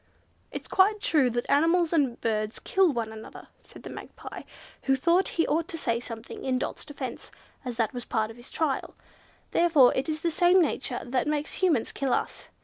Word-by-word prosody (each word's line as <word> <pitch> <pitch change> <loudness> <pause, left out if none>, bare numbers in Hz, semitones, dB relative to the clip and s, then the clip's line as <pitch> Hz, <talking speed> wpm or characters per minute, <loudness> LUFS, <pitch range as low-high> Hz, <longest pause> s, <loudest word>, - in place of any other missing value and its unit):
"It's - - -6
quite 410 +3 +3
true 295 -10 +3
that 240 0 -2
animals 330 +3 +3
and 270 -7 +1
birds 215 -1 -1
kill 380 -3 +2
one 230 -4 -3
another," 220 0 -11
said - - -15
the - - -7
Magpie, - - -9 0.4
who 270 - +4
thought 340 +8 +3
he 330 - +3
ought 320 +2 0
to 335 - -5
say 235 -6 0
something 230 -1 -8
in 260 -1 +1
Dot's - - -4
defence, 280 -5 -7 0.3
as 250 -3 -4
that 225 0 0
was 245 - -4
his - - -34
part 220 -1 0
in 225 - -14
the - - -13
trial, 280 +2 -2 0.6
"therefore 315 -7 +5
it 270 +4 -1
is 310 0 -2
the 335 - 0
same 355 +3 +5
nature 305 -6 0
that 255 +2 -1
makes 300 +3 -2
Humans 320 -11 +2
kill 270 -2 -1
us. - - -3
275 Hz, 200 wpm, -27 LUFS, 240-330 Hz, 0.6 s, therefore